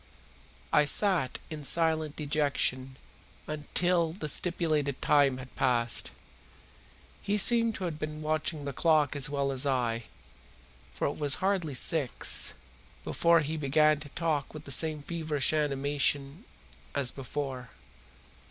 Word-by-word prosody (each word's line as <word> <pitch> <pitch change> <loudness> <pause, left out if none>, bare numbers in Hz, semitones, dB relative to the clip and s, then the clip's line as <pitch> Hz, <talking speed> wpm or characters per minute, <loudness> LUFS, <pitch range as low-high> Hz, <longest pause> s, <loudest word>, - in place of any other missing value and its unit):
I 150 - +5
sat 170 - +1
in 155 -2 -6
silent 160 0 +1
dejection 140 -3 -1 0.5
until 165 +2 0
the 165 -4 -5
stipulated 155 -4 0
time 140 -3 +3
had 130 0 -11
passed. 120 -2 +1 1.1
He 205 +1 -1
seemed 230 +1 +4
to - - -6
have 165 -4 -4
been 155 0 -5
watching 155 -1 -2
the 140 - -4
clock 155 -1 +2
as 145 +1 0
well 140 -1 -1
as 130 0 +2
I, 120 -4 -1 0.9
for - - -3
it - - -3
was 145 -3 +4
hardly 185 -7 -1
six 140 -1 +2 0.5
before 170 -1 +3
he 155 +2 -4
began 150 +1 +2
to 150 -1 -9
talk 155 -2 -2
with 155 - -8
the 140 - -8
same 155 +1 +2
feverish 155 -4 -1
animation 145 - 0 0.5
as 140 -3 +1
before. 130 -2 -6
150 Hz, 130 wpm, -29 LUFS, 140-160 Hz, 1.1 s, I